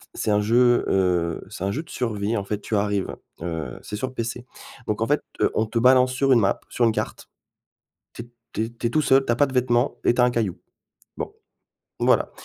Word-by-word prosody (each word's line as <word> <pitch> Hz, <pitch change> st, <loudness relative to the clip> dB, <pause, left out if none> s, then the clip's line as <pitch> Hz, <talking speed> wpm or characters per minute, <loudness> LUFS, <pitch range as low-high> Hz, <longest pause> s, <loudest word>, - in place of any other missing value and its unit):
c'est 110 Hz, -, -1 dB
un 105 Hz, 0 st, +3 dB
jeu, 120 Hz, +3 st, +4 dB
heu, 90 Hz, -3 st, +1 dB
c'est -, -, -7 dB
un 100 Hz, -, 0 dB
jeu 150 Hz, +9 st, -3 dB
de 155 Hz, -, -21 dB
survie. 110 Hz, -2 st, -2 dB
En 100 Hz, -, -2 dB
fait, 105 Hz, +1 st, -3 dB
tu 110 Hz, -, -3 dB
arrives, 100 Hz, -1 st, 0 dB, 0.3 s
heu, 80 Hz, -2 st, -4 dB
c'est -, -, -6 dB
sur 130 Hz, +4 st, -4 dB
PC, 120 Hz, 0 st, -4 dB, 0.4 s
donc 105 Hz, -, -1 dB
en 115 Hz, -, +1 dB
fait, 145 Hz, +1 st, +2 dB, 0.2 s
heu, -, -, +3 dB
on 110 Hz, -, +2 dB
te 115 Hz, +2 st, -1 dB
balance 130 Hz, +1 st, +5 dB
sur 135 Hz, +1 st, +1 dB
une 120 Hz, -, +5 dB
map, 100 Hz, -, +1 dB
sur 125 Hz, -, -1 dB
une 115 Hz, -, +4 dB
carte. -, -, -4 dB, 0.9 s
Tu -, -, -6 dB
es 120 Hz, -, -14 dB, 0.2 s
tu 110 Hz, -, -1 dB
es 115 Hz, -, -6 dB
tu 115 Hz, 0 st, -4 dB
es -, -, -6 dB
tout 155 Hz, -, +2 dB
seul, 135 Hz, -1 st, +4 dB
tu 120 Hz, -, +1 dB
as -, -, 0 dB
pas 145 Hz, -, +4 dB
de 135 Hz, -, -8 dB
vêtements 125 Hz, +1 st, +2 dB
et -, -, +4 dB
tu 125 Hz, -, +1 dB
as -, -, +7 dB
un 125 Hz, -, +3 dB
caillou. 110 Hz, -7 st, -1 dB, 0.6 s
Bon, -, -, -4 dB, 0.7 s
voilà, -, -, +2 dB
115 Hz, 240 wpm, -24 LUFS, 105-125 Hz, 0.9 s, as